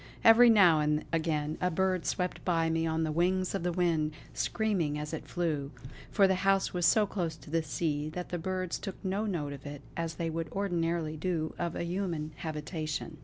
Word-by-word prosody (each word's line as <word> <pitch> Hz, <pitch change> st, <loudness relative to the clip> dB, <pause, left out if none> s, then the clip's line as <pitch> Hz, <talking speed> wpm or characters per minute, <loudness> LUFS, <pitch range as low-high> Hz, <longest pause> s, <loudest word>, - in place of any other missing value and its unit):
Every 235 Hz, +2 st, +8 dB
now 185 Hz, -8 st, +6 dB
and 150 Hz, 0 st, +1 dB
again 155 Hz, -2 st, 0 dB
a 180 Hz, -, +2 dB
bird 185 Hz, -2 st, 0 dB
swept 180 Hz, -1 st, -2 dB
by 165 Hz, -2 st, +1 dB
me 165 Hz, 0 st, +1 dB
on 160 Hz, 0 st, 0 dB
the 155 Hz, -, -1 dB
wings 180 Hz, +3 st, +1 dB
of 195 Hz, -, -1 dB
the 175 Hz, +1 st, 0 dB
wind, 165 Hz, -3 st, +1 dB, 0.2 s
screaming 190 Hz, -10 st, 0 dB
as 150 Hz, +1 st, -5 dB
it 160 Hz, -, -5 dB
flew; 155 Hz, -6 st, -1 dB, 0.4 s
for 200 Hz, -2 st, +4 dB
the 190 Hz, -, +3 dB
house 195 Hz, 0 st, +2 dB
was 175 Hz, -3 st, +3 dB
so 215 Hz, +4 st, +5 dB
close 175 Hz, -5 st, -3 dB
to 155 Hz, -, -14 dB
the 165 Hz, 0 st, +2 dB
sea 150 Hz, -1 st, -2 dB
that 180 Hz, +3 st, -6 dB
the 175 Hz, -, -3 dB
birds 185 Hz, +1 st, -2 dB
took 195 Hz, -2 st, -5 dB
no 200 Hz, +3 st, 0 dB
note 150 Hz, -7 st, -2 dB
of 140 Hz, -1 st, -10 dB
it 145 Hz, 0 st, -8 dB
as 165 Hz, -1 st, -3 dB
they 165 Hz, 0 st, -2 dB
would 165 Hz, -1 st, -4 dB
ordinarily 170 Hz, -5 st, -1 dB
do 160 Hz, -1 st, -1 dB
of 170 Hz, -1 st, -2 dB
a -, -, -2 dB
human 170 Hz, -3 st, -2 dB
habitation. 155 Hz, 0 st, -4 dB
165 Hz, 205 wpm, -30 LUFS, 155-185 Hz, 0.4 s, Every